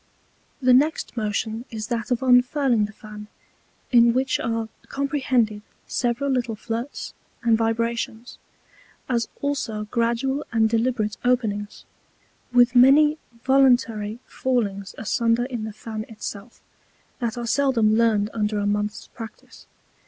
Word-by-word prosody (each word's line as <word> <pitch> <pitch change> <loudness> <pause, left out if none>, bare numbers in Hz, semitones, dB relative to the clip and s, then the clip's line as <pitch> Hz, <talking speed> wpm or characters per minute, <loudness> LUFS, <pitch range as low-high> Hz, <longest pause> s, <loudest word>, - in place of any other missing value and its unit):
The 255 0 +6
next 290 +2 +2
Motion 220 +1 -2
is 215 -1 -5
that 235 -1 -2
of 245 0 0
unfurling 250 -2 +3
the 210 - -8
Fan, 210 0 -11 0.6
in 235 -2 +6
which 260 +1 +1
are 230 -1 -2 0.2
comprehended 260 -6 0 0.2
several 245 +3 -1
little 245 -3 -1
Flirts 230 +5 -5 0.3
and 230 -1 +4
Vibrations, 230 +1 -2 0.7
as 235 -3 0
also 260 -7 -2
gradual 240 +4 0
and 225 -2 +3
deliberate 225 -2 0
Openings, 215 -5 -1 0.7
with 245 0 +4
many 295 +5 +6 0.2
voluntary 245 -5 +3
Fallings 205 -7 -2
asunder 230 +2 +1
in 240 -4 -4
the 220 - -5
Fan 220 -1 -4
itself, 215 0 -8 0.6
that 235 -1 -2
are 240 - -3
seldom 230 -4 +2
learned 220 -2 +2
under 210 -1 -1
a 205 - -1
Month's 210 +1 -1
Practice. 225 -1 -11
230 Hz, 125 wpm, -23 LUFS, 215-250 Hz, 0.7 s, The